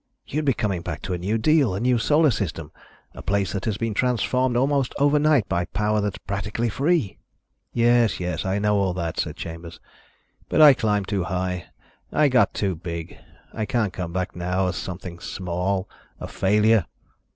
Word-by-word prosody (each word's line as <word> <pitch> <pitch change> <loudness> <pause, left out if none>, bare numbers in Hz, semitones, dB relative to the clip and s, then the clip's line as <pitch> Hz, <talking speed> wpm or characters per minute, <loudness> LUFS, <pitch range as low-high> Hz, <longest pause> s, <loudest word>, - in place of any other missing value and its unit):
You'd 150 +2 -3
be 135 - +3
coming 95 -5 -1
back - - -6
to 95 - -3
a - - -1
new 100 +6 0
deal, 140 -4 +3
a - - -2
new 125 +1 +2
Solar 150 +5 +4
System, 80 -8 -4 0.4
a - - -9
place 100 -1 0
that 95 - -3
has 110 -3 -1
been 115 -1 -2
transformed 125 +2 +1
almost 135 0 +1
overnight 145 -4 +3
by 90 -1 0
power 105 +4 0
that's 100 -1 -2
practically 105 +4 -3
free." 140 - 0 0.5
"Yes, 120 -2 +3
yes, 90 -3 -2
I 95 +1 -1
know 105 0 +2
all 95 -2 0
that," 85 -3 -3
said 80 -2 -2
Chambers. 85 -1 -8 0.7
"But - - +1
I 150 -2 +10
climbed 105 -5 0
too 100 -4 -1
high. 90 0 -2 0.5
I 150 -1 +3
got 130 -1 +3
too 100 -2 0
big. 85 0 -6 0.4
I 110 -1 -3
can't 110 -6 0
come 90 -1 -4
back 90 +1 -3
now 90 +2 -1
as 90 0 -1
something 90 -2 -6
small, 95 +2 -2 0.3
a - - -6
failure." 105 0 +2
100 Hz, 180 wpm, -24 LUFS, 90-120 Hz, 0.7 s, I